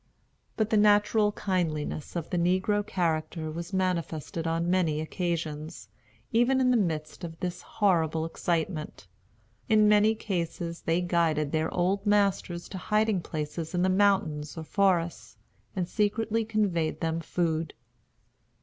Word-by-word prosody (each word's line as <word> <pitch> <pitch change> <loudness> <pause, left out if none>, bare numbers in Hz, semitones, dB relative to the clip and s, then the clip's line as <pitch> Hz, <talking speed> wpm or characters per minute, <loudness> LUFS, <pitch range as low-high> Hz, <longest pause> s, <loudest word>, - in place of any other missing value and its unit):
But 220 -1 0
the 215 - +4
natural 210 0 +4
kindliness 165 -7 -2
of 170 -2 -4
the 180 - 0
negro 185 +4 +2
character 160 -3 -2
was 170 +3 -6
manifested 170 -3 -2
on 165 +1 0
many 175 -4 +1
occasions, 160 -1 -4 0.4
even 240 +3 +3
in 255 -1 +3
the - - +4
midst 160 -7 -1
of 165 -1 -7
this 180 -1 -4
horrible 165 -6 +1
excitement. 165 - -3 0.6
In 215 -1 +5
many 210 +1 +5
cases 170 -4 -3
they 165 +2 +1
guided 165 -4 +1
their 160 0 0
old 185 +3 0
masters 200 -4 +1
to 190 - -6
hiding 210 -1 +1
places 160 +2 -4
in 175 - +2
the 190 - +3
mountains 185 -7 +1
or 160 - -4
forests, 175 -1 0 0.4
and 180 -2 -1
secretly 220 +2 0
conveyed 200 -8 0
them 165 0 0
food. 165 -1 -1
175 Hz, 135 wpm, -28 LUFS, 160-205 Hz, 0.6 s, In